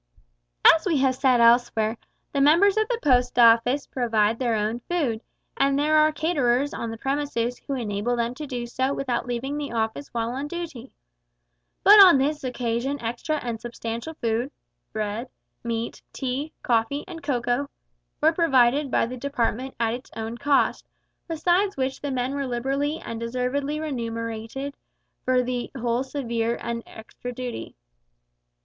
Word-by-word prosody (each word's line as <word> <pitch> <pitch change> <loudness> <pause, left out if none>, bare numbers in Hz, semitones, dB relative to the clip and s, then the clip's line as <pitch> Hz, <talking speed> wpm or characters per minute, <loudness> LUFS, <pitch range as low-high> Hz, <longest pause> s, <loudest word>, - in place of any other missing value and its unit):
As 325 - +8
we 330 -5 +2
have 265 -1 +3
said 255 -2 +3
elsewhere, 230 -2 +4 0.4
the 280 - +1
members 340 +8 +5
of 435 0 +2
the 485 - 0
Post 250 -3 +3
Office 235 +4 +5
provide 225 -3 +1
their 240 -3 +1
own 215 +2 -1
food, 275 -11 0 0.3
and 275 0 +2
there 300 +2 +2
are 310 0 +5
caterers 285 -4 +1
on 230 - -4
the 225 - -6
premises 270 -2 -2
who 275 - -1
enable 225 0 -1
them 235 0 -1
to 300 +3 -7
do 245 -3 -4
so 260 +3 -1
without 255 -2 -2
leaving 255 +4 -3
the 290 - -4
Office 225 +4 -2
while 230 0 -2
on 270 +3 -4
duty. 310 -7 -7 0.9
But 410 +1 +9
on 360 -7 +8
this 295 +2 0
occasion 250 +2 -2
extra 240 +7 -2
and 235 -2 -4
substantial 235 +5 -5
food 235 +1 -1 0.4
meat, 215 +3 -3 0.3
bread, 230 0 -4
tea, 270 +3 -3
coffee, 240 +5 +1
and 340 -3 -8
cocoa 250 0 -1 0.5
were 315 +2 +4
provided 275 -4 +3
by - - +2
the 250 +2 -6
Department 260 -1 -2
at 230 -1 +1
its 250 +2 -7
own 225 +1 -4
cost, 280 +2 +1 0.4
besides 350 +4 +1
which 265 0 -2
the 285 - -3
men 260 0 -1
were 280 -1 -2
liberally 275 +5 -1
and 230 -7 -6
deservedly 255 +5 -2
remunerated 230 -1 -4 0.5
for 255 -1 +3
the 245 -1 -3
whole 240 0 0
severe 235 -4 -2
and 235 0 -4
extra 225 +2 -9
duty. 245 -1 -6
255 Hz, 155 wpm, -25 LUFS, 235-285 Hz, 0.9 s, But